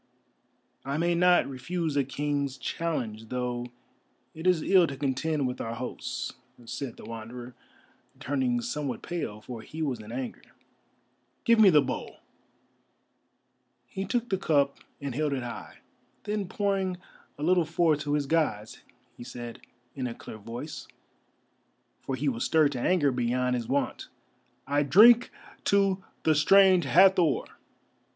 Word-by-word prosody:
"I 140 +2 -2
may 170 +2 +2
not 180 +1 +4
refuse 150 +4 -3
a 140 - +3
King's 140 0 -2
challenge, 120 -7 -3
though 125 -1 -3 0.7
it 160 +3 -4
is 175 -4 +3
ill 185 -3 +5
to 135 - -6
contend 145 +2 -1
with 125 - -4
our 115 0 -4
hosts," 125 +1 -5 0.3
said 125 +1 -6
the - - -11
Wanderer, 120 +2 -8 0.7
turning 130 -3 0
somewhat 125 +1 -4
pale, 135 -12 -4
for 115 0 -8
he 160 +7 -6
was 130 -6 -2
in 105 +1 -10
anger. 125 0 -5 1.0
"Give 230 -1 +4
me 210 -3 +8
the 150 -5 +5
bowl!" - - -5 1.7
He 195 - -5
took 235 +4 -1
the 190 - +1
cup, 140 -5 +1 0.2
and 140 -2 -4
held 150 +2 0
it 130 -2 -2
high; 120 - -8 0.4
then 210 -2 -2
pouring 195 -3 -1 0.4
a 145 - -6
little 180 +1 +4
forth 160 -1 +2
to 145 0 -2
his 145 -1 +1
Gods, 135 -9 -1 0.3
he - - -10
said, 120 -1 -8 0.3
in 130 -2 -3
a 115 - -6
clear 110 - -10
voice, 120 +8 -7 1.1
for 135 - -3
he 140 +3 -2
was 120 -4 0
stirred 155 -3 +3
to 130 - -4
anger 155 -5 +3
beyond 125 +1 0
his 120 -2 -3
wont: 140 +3 -1 0.6
"_I 145 +1 +2
drink 230 - +7 0.4
to 195 -1 +2 0.2
the 160 - +4
Strange 185 +3 +5
Hathor! 180 +2 +5
145 Hz, 145 wpm, -28 LUFS, 125-175 Hz, 1.7 s, me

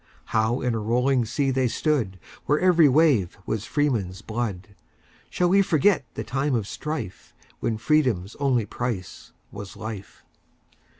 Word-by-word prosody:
How 110 +3 +1
in 125 -2 0
a 115 - -1
rolling 125 +3 +1
sea 135 +4 0
they 130 -1 +1
stood, 120 - 0 0.3
Where 150 +1 +3
every 175 -5 +5
wave 130 - +3
was 110 0 -2
freemen's 115 -11 -1
blood,—Shall 110 - -5
we 195 +2 +5
forget 175 -2 +2
the - - -3
time 135 +1 -1
of 110 -4 -1
strife, 150 - -6 0.2
When 110 - -1
freedom's 110 - +1
only 130 -6 +1
price 105 -7 -5 0.2
was 100 -1 -9
life? 105 -3 -8
120 Hz, 135 wpm, -25 LUFS, 105-145 Hz, 0.3 s, every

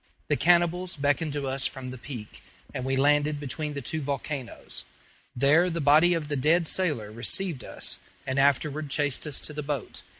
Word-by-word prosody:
The - - +3
cannibals 175 0 +3
beckoned 145 +2 +1
to 145 -2 -2
us 135 0 +1
from 130 -2 -7
the 130 - -7
peak, 120 -5 -8 0.3
and 130 - -3
we 135 0 0
landed 145 +2 +3
between 145 +2 -4
the 140 - -4
two 160 +5 -2
volcanoes. 140 -2 -4 0.5
There 150 +8 +4
the 170 -1 -2
body 155 +4 +5
of 160 -3 -2
the 145 - -2
dead 160 +6 +3
sailor 145 - 0
received 130 - -1
us, - - -2 0.3
and 130 +1 0
afterward 145 +2 +2
chased 145 +1 0
us 145 - -1
to 150 - -7
the 150 - -4
boat. 145 -4 -4
145 Hz, 180 wpm, -27 LUFS, 135-155 Hz, 0.5 s, body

